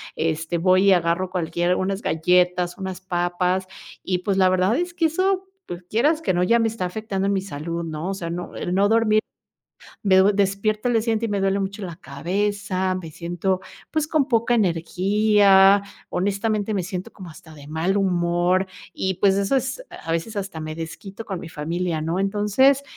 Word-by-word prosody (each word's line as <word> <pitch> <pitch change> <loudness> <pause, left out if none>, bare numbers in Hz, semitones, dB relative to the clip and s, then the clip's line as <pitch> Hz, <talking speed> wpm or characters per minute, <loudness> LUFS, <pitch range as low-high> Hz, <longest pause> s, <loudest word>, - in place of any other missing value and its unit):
este, 160 +1 -1
voy 185 +2 +4
y 195 - +7
agarro 175 +1 +1
cualquier 175 0 0
unas 195 +2 -2
galletas, 180 +2 +2
unas 190 -1 -5
papas 180 +1 -1 0.4
y 180 -1 -1
pues, 195 +1 -1
la 185 -1 +5
verdad, 185 +7 +2
es 350 0 -2
que 335 -2 +1
eso, 375 +3 0 0.2
pues, 175 +1 -7
quieras 300 +9 +2
que 185 - 0
no, 175 - +1
ya 230 +6 +4
me 225 -1 +2
está 215 -5 -4
afectando 195 0 -3
en 200 - +1
mi 190 - 0
salud, 170 -1 -5
¿no? 160 +3 -4
O - - -2
sea, 170 -3 -5
no 175 +1 -6
el 180 - -3
no 200 +1 +4
dormir, 220 -1 +4 0.8
me 190 -2 +5
du 195 +2 +6
despierto 205 +3 0
al 245 - +1
día 225 - +3
siguiente 230 0 0
y - - -5
me 205 - 0
duele 195 +1 +1
mucho 195 +1 -4
la 170 -3 -6
cabeza, 185 +5 -2
me 165 -4 -7
siento, 175 +3 -2 0.3
pues, 310 -1 0
con 305 -4 +1
poca 235 -1 +2
energía, 195 +2 +4 0.3
honestamente, 205 +3 -1
me 190 -3 -1
siento 185 0 -5
como 185 -4 -10
hasta 160 0 -14
de 145 -1 -13
mal 165 +6 0
humor 180 0 +1 0.3
y, 190 -1 -2
pues, 195 +1 +3
eso 200 +7 +1
es 265 - -2
a 165 - -7
veces 165 +7 -2
hasta 195 -5 -4
me 155 0 -5
desquito 190 +6 -8
con 190 -3 -4
mi 165 - -8
familia, 165 +1 -2
¿no? 165 +4 -1
Entonces, 210 +8 +3
190 Hz, 195 wpm, -23 LUFS, 175-210 Hz, 0.8 s, y